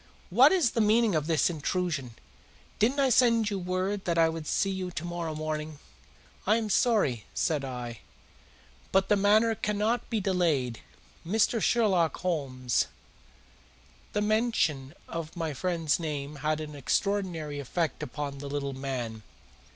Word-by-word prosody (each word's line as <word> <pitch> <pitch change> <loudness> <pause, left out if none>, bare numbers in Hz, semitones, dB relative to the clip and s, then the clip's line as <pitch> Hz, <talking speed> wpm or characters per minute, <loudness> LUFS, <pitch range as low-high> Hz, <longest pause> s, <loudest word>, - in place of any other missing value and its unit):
"What 255 - +7
is 345 -11 +3
the 230 - +1
meaning 220 0 +4
of 155 -2 0
this 160 -2 +3
intrusion? 160 -6 -2 0.6
Didn't 245 +7 +2
I 270 -1 +4
send 230 -3 +4
you 200 - -1
word 185 +2 -2
that 170 -1 0
I 165 -1 +5
would 160 -1 -5
see 195 - +1
you 190 -1 -3
to 175 -1 -5
morrow 170 -2 -4
morning?" 155 0 -4 0.7
"I 215 - +5
am 220 -2 -1
sorry," 190 - +2
said 150 -4 0
I, 120 -4 -6 0.9
"but 195 0 +2
the 210 - +5
matter 215 +3 +4
cannot 210 +3 -1
be 225 - 0
delayed. 165 - 0 0.4
Mr. 220 +5 +1
Sherlock 190 -9 +2
Holmes 135 -8 0 0.6
" 60 0 -29
The 210 - +1
mention 210 - +1
of 165 0 -6
my 165 -3 -2
friend's 165 0 0
name 150 -2 -4
had 155 +2 -1
an 150 -1 -7
extraordinary 160 +1 -1
effect 155 +3 -2
upon 140 0 -5
the 140 0 -6
little 140 -1 -3
man. 125 -5 -4
165 Hz, 150 wpm, -28 LUFS, 145-205 Hz, 0.9 s, What